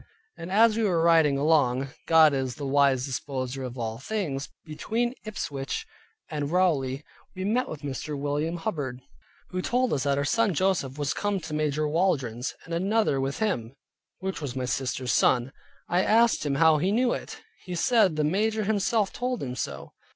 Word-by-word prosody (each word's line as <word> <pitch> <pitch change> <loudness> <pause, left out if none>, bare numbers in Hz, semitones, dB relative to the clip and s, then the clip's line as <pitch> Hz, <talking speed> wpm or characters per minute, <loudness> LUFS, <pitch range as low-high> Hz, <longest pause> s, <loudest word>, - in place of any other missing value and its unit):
And 170 +2 -8
as 220 +2 +5
we 225 - +1
were 175 -6 +2
riding 160 -4 +4
along 140 -3 +2 0.2
(God 160 -2 +6
is 130 -3 -2
the 145 - -6
wise 135 -2 +3
disposer 130 -1 -4
of 125 0 -6
all 115 -1 -4
things) 145 -5 -3 0.2
between 225 +10 -2
Ipswich 140 -10 -4 0.4
and 145 -1 -3
Rowley 150 -7 +1 0.3
we 185 0 -4
met 240 +5 0
with 150 - -7
Mr. 145 +2 -4
William 145 +4 -1
Hubbard, 145 - -3 0.5
who 185 0 -3
told 250 +4 +1
us 140 - 0
that 140 -1 +2
our 140 - 0
son 215 +3 +2
Joseph 160 -7 0
was 145 -1 -1
come 205 -1 -1
in 190 - -2
to 155 - -7
Major 150 0 0
Waldron's, 150 -7 0
and 165 - -7
another 190 -5 +1
with 135 +1 -2
him, 135 - -2 0.4
which 190 -2 -4
was 135 -4 -4
my 130 -1 -2
sister's 130 0 -1
son. 125 +2 +3 0.4
I 175 +2 +2
asked 225 -6 +3
him 140 - 0
how 160 0 +5
he 185 +6 +1
knew 240 +3 +2
it? - - -6 0.3
He 180 -2 -4
said 200 -2 +3
the 155 - +1
major 215 +7 +1
himself 210 0 +1
told 250 0 -2
him 125 -2 -4
so. - - -5
155 Hz, 180 wpm, -26 LUFS, 135-195 Hz, 0.5 s, God